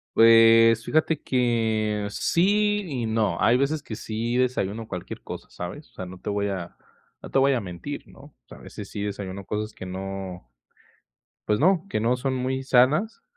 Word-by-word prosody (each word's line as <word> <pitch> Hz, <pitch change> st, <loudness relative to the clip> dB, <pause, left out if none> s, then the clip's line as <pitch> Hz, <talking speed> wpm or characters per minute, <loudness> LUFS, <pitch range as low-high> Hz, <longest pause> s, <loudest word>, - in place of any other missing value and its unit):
Pues 115 Hz, 0 st, +7 dB
fíjate 155 Hz, -1 st, +1 dB
que 110 Hz, -4 st, 0 dB
sí 205 Hz, -, +2 dB
y 125 Hz, -6 st, -3 dB
no. 110 Hz, -6 st, 0 dB
Hay 120 Hz, +2 st, +4 dB
veces 140 Hz, +3 st, 0 dB
que 115 Hz, -, -7 dB
sí 115 Hz, +2 st, -3 dB
desayuno 115 Hz, -4 st, -1 dB
cualquier 90 Hz, -2 st, -7 dB
cosa, -, -, -8 dB
¿sabes?, 90 Hz, -, -7 dB
o -, -, -33 dB
sea, 95 Hz, -, -6 dB
no 90 Hz, 0 st, -10 dB
te 105 Hz, -, -4 dB
voy 100 Hz, 0 st, -1 dB
a 90 Hz, -3 st, -5 dB, 0.4 s
no -, -, -10 dB
te -, -, +3 dB
voy 135 Hz, +1 st, +4 dB
a 125 Hz, -, +1 dB
mentir, 90 Hz, -4 st, -7 dB
¿no?, -, -, -17 dB
o -, -, -15 dB
sea, -, -, -12 dB
a -, -, -17 dB
veces 100 Hz, -2 st, -9 dB
sí 100 Hz, -, -5 dB
desayuno 100 Hz, -1 st, -5 dB
cosas 105 Hz, +2 st, -3 dB
que 95 Hz, -, -9 dB
no 95 Hz, -4 st, -6 dB, 1.0 s
pues 105 Hz, -, +2 dB
no, 185 Hz, +3 st, +3 dB
que 110 Hz, -, -1 dB
no 120 Hz, +3 st, +1 dB
son 135 Hz, 0 st, -1 dB
muy 130 Hz, +1 st, -2 dB
sanas. 140 Hz, -, +2 dB
115 Hz, 190 wpm, -25 LUFS, 100-130 Hz, 1.0 s, Pues